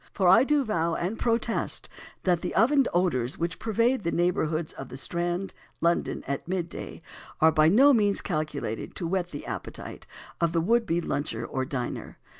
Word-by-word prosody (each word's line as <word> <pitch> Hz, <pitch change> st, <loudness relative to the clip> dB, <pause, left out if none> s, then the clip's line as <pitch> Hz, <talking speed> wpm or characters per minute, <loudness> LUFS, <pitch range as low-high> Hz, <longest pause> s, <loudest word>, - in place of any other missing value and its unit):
For 190 Hz, -3 st, +2 dB
I 185 Hz, +7 st, +7 dB
do 290 Hz, +1 st, +2 dB
vow 170 Hz, -6 st, 0 dB
and 190 Hz, +6 st, -3 dB
protest 230 Hz, -1 st, 0 dB, 0.4 s
that 175 Hz, -3 st, +2 dB
the 180 Hz, -, -4 dB
oven 265 Hz, +5 st, +4 dB
odours 155 Hz, -8 st, 0 dB
which 170 Hz, +1 st, -3 dB
pervade 230 Hz, +3 st, +1 dB
the 170 Hz, -, -1 dB
neighbourhood 165 Hz, -2 st, 0 dB
of 135 Hz, -, -8 dB
the 130 Hz, -, -7 dB
Strand, 175 Hz, +5 st, -2 dB, 0.3 s
London, 170 Hz, +1 st, 0 dB
at 140 Hz, +2 st, -4 dB
midday, 175 Hz, -2 st, -4 dB, 0.4 s
are 160 Hz, +1 st, +6 dB
by 155 Hz, 0 st, +4 dB
no 270 Hz, +10 st, +6 dB
means 205 Hz, -4 st, +3 dB
calculated 150 Hz, -, -3 dB
to 175 Hz, -, -3 dB
whet 180 Hz, +1 st, -1 dB
the 145 Hz, -, -7 dB
appetite -, -, -7 dB, 0.3 s
of 170 Hz, -1 st, +2 dB
the 165 Hz, -, +2 dB
would 230 Hz, +6 st, +2 dB
be 170 Hz, +1 st, +1 dB
luncher 145 Hz, -2 st, -2 dB
or 130 Hz, 0 st, -2 dB
diner. 130 Hz, -2 st, -5 dB
175 Hz, 175 wpm, -27 LUFS, 160-210 Hz, 0.4 s, I